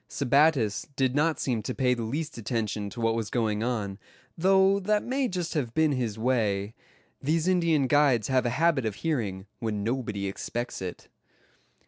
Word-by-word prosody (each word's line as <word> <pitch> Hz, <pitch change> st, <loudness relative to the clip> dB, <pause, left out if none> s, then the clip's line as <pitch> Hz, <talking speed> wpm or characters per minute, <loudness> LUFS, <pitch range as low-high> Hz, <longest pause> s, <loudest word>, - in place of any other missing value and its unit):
Sebattis 140 Hz, -5 st, +2 dB
did 130 Hz, -2 st, +1 dB
not 155 Hz, +3 st, +1 dB
seem 120 Hz, -5 st, -1 dB
to -, -, -4 dB
pay 125 Hz, -2 st, +2 dB
the 120 Hz, -, -3 dB
least 145 Hz, +8 st, -3 dB
attention 110 Hz, -3 st, -2 dB
to 120 Hz, -, -9 dB
what 115 Hz, -1 st, +2 dB
was 115 Hz, -2 st, -2 dB
going 110 Hz, -3 st, 0 dB
on; 110 Hz, -5 st, -2 dB, 0.4 s
though 190 Hz, +2 st, +4 dB
that 210 Hz, +2 st, +1 dB
may 265 Hz, +1 st, 0 dB
just 180 Hz, -5 st, -3 dB
have 125 Hz, -7 st, -2 dB
been 160 Hz, -1 st, +3 dB
his 120 Hz, -6 st, -2 dB
way. 110 Hz, -4 st, 0 dB, 0.5 s
These 160 Hz, +4 st, +1 dB
Indian 170 Hz, -6 st, +3 dB
guides 135 Hz, -4 st, +3 dB
have 130 Hz, -2 st, +2 dB
a 120 Hz, -, -2 dB
habit 155 Hz, -7 st, +2 dB
of 105 Hz, -, -3 dB
hearing, 105 Hz, -, -2 dB
when 105 Hz, -3 st, -2 dB
nobody 110 Hz, -4 st, -2 dB
expects 120 Hz, +5 st, -4 dB
it. 90 Hz, -1 st, -6 dB
125 Hz, 170 wpm, -27 LUFS, 110-155 Hz, 0.5 s, though